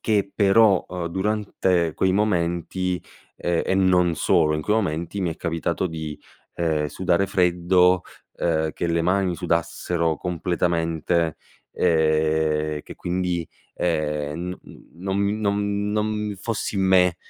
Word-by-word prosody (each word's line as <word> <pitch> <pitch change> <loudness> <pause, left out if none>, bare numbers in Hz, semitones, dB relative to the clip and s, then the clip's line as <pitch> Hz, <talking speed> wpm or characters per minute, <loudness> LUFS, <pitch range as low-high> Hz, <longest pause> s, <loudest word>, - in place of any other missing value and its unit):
che 100 -3 +1
però, 100 -1 +4
uhm, 90 -2 -4
durante 95 -3 0
quei 95 -1 +2
momenti, 90 -2 0 0.4
ehm, 85 -1 0
e - - 0
non 90 -3 +3
solo 75 +1 +3
in - - -2
quei 105 +5 +1
momenti, 85 -2 -2
mi 90 -3 0
è 80 - -6
capitato 85 +2 -2
di, 80 -3 -6 0.3
ehm, 80 -3 0
sudare 90 +4 0
freddo, 90 0 +3 0.3
ehm, 80 -2 0
che 85 - -3
le 85 0 +1
mani 90 0 +1
sudassero 85 -1 -1
completamente, 85 -1 -1 0.3
ehm, 80 -2 +1
che - - -10
quindi, 90 -1 -2 0.3
ehm, 75 0 -2
n 90 - -7 0.4
non 95 +3 -1 0.2
nom 100 -1 +1 0.3
non 105 -1 -1
fossi 110 -1 -3
in 95 - +1
me, 90 -2 +4
90 Hz, 130 wpm, -23 LUFS, 80-95 Hz, 0.4 s, però